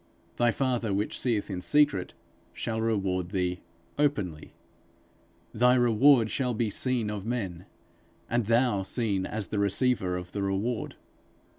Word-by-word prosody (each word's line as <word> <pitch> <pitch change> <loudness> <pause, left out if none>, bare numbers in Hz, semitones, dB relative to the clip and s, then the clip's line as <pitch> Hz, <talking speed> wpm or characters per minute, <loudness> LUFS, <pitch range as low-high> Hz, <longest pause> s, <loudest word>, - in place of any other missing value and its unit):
'Thy 120 0 +3
father, 120 -3 0
which 100 +2 -2
seeth 115 -5 0
in 90 -1 -4
secret, 100 -6 +2 0.4
shall 110 -1 -3
reward 95 -5 -1
thee 90 -2 -1 0.4
openly.' 105 - -1 1.0
_Thy 125 +2 +4
reward 120 0 +5
shall 125 -3 -1
be 110 -1 0
seen 120 -2 0
of 105 -2 -5
men! 100 -6 -4 0.6
and 120 -3 0
thou 115 -3 +2
seen 100 -2 -1
as 105 -2 -4
the 105 - -2
receiver 100 -2 +1
of 90 0 -8
the 100 - -3
reward! 100 +5 -2
110 Hz, 135 wpm, -28 LUFS, 95-120 Hz, 1.0 s, reward